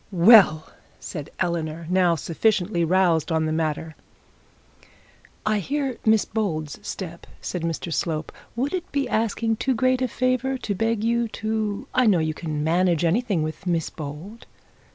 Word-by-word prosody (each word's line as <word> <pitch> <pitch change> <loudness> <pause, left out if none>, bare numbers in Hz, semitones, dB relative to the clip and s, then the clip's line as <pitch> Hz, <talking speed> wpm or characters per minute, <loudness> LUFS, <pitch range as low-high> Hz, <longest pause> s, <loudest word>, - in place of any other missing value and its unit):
'Well!' 180 -4 +6 0.3
said 150 -4 -7
Eleanor, 165 -1 -2
now 180 -1 +3
sufficiently 175 +2 0
roused 175 -2 +2
on 160 -1 +1
the 155 - -1
matter. 160 0 -2 1.5
'I 215 -1 +1
fear 275 +2 -2
Miss 220 -1 +4
Bold's 160 -9 -3
step,' 175 -4 -7
said 180 - -4
Mr 165 0 -3
Slope, 160 -1 -2 0.2
'would 265 +7 -1
it 365 -1 -4
be 280 -1 0
asking 225 0 0
too 255 +2 0
great 255 +2 +2
a 255 - +2
favour 255 +1 0
to 220 -5 -3
beg 225 +2 0
you 235 +1 +1
to 215 -2 -3
I 255 -2 +3
know 200 -4 +5
you 160 -1 0
can 155 -2 -4
manage 175 +1 +2
anything 195 -1 +1
with 155 +4 -6
Miss 165 -2 0
Bold.' 160 +9 -8
185 Hz, 155 wpm, -24 LUFS, 160-225 Hz, 1.5 s, Well